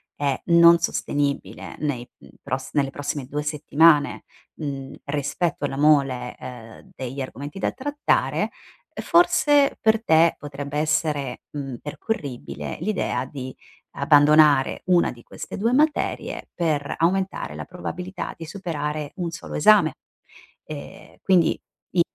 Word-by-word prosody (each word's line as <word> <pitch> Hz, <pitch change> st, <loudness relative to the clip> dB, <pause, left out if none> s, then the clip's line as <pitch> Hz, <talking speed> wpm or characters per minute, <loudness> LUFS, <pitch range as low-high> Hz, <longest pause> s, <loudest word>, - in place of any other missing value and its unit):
è 140 Hz, -2 st, -1 dB
non 170 Hz, 0 st, +7 dB
sostenibile 145 Hz, -3 st, -2 dB
nei, 135 Hz, -5 st, -3 dB
mhmm, -, -, -16 dB
pros 130 Hz, +1 st, -4 dB
nelle 140 Hz, -2 st, +1 dB
prossime 145 Hz, -1 st, -4 dB
2 150 Hz, +2 st, -3 dB
settimane, 150 Hz, 0 st, +3 dB, 0.3 s
mhmm, 140 Hz, -3 st, -5 dB
rispetto 145 Hz, +2 st, -1 dB
alla 135 Hz, -, -3 dB
mole, 135 Hz, -4 st, +3 dB
ehm, 115 Hz, -3 st, -11 dB
degli 130 Hz, +1 st, -6 dB
argomenti 140 Hz, +7 st, -7 dB
da -, -, 0 dB
trattare, 290 Hz, +2 st, 0 dB, 0.5 s
uhm, -, -, -5 dB
forse 295 Hz, -5 st, +4 dB
per 220 Hz, 0 st, +3 dB
te 160 Hz, +1 st, +5 dB
potrebbe 145 Hz, 0 st, -6 dB
essere, 150 Hz, -4 st, 0 dB
mhmm, 135 Hz, -4 st, -5 dB
percorribile 145 Hz, -, -5 dB
l'idea 175 Hz, -10 st, -1 dB
di 130 Hz, -1 st, -7 dB, 0.4 s
abbandonare 145 Hz, -2 st, +5 dB
una 180 Hz, -1 st, +3 dB
di 120 Hz, -, -13 dB
queste -, -, -8 dB
2 230 Hz, +4 st, +1 dB
materie 300 Hz, +2 st, 0 dB
per 155 Hz, -5 st, -1 dB
aumentare 190 Hz, +3 st, 0 dB
la -, -, -6 dB
probabilità 180 Hz, +1 st, -6 dB
di 165 Hz, -, -9 dB
superare 155 Hz, -5 st, -4 dB
1 175 Hz, -2 st, -2 dB
solo 165 Hz, -, -8 dB
esame. 210 Hz, +7 st, +5 dB, 0.7 s
Ehm, -, -, -10 dB
quindi 180 Hz, -4 st, +3 dB, 0.3 s
io, 175 Hz, -, +3 dB
150 Hz, 125 wpm, -23 LUFS, 140-175 Hz, 0.7 s, non